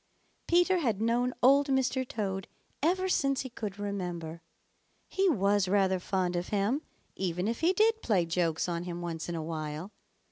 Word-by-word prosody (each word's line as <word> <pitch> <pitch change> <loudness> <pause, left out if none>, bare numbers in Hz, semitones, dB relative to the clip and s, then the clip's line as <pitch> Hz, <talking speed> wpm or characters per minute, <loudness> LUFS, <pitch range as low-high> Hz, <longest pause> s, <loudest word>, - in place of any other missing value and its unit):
Peter 355 +1 +4
had 230 - 0
known 235 +3 +1
Old 275 +3 +6
Mr. 265 -1 +1
Toad 195 -4 -3 0.3
ever 370 +5 +2
since 275 -7 +1
he 260 - -7
could 210 -4 -5
remember. 175 -5 -4 0.7
He 385 0 +2
was 200 - +2
rather 190 -1 +2
fond 180 -1 -1
of 175 +1 -2
him, 210 +8 0 0.3
even 180 0 -1
if 230 +1 -2
he 335 +3 +3
did 445 +3 +3
play 190 -7 +2
jokes 165 -1 0
on 170 0 -3
him 175 -1 -5
once 165 -1 -4
in 170 - -3
a 160 - -3
while. 155 +3 -5
200 Hz, 170 wpm, -30 LUFS, 175-265 Hz, 0.7 s, Old